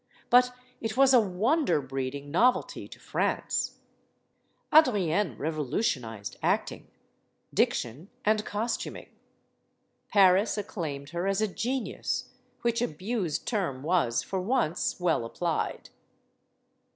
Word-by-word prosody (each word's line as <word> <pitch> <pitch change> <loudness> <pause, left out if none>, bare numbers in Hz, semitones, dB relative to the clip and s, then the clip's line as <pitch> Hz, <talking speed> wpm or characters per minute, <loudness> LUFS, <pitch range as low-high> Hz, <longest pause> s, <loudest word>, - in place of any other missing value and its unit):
But 250 0 +5 0.3
it 225 +1 -3
was 270 0 +6
a 250 - +8
wonder 220 - +2
breeding 135 +1 -4
novelty 245 +10 +2
to - - -13
France. - - -1 1.0
Adrienne 205 - +4
revolutionized 140 - -2
acting, - - -1 0.7
diction, 135 - 0 0.2
and 215 0 +3
costuming. 220 +4 -3 1.0
Paris 195 +2 +5
acclaimed 155 -9 -5
her 175 +2 -2
as 195 0 +1
a 215 - +2
genius; 245 +5 -3 0.3
which 235 0 +1
abused 190 -3 -2
term 175 - -1
was 155 -8 +1
for 190 -1 -3
once 195 -7 0
well 170 -8 +1
applied. 165 +8 -3
185 Hz, 105 wpm, -28 LUFS, 150-225 Hz, 1.0 s, a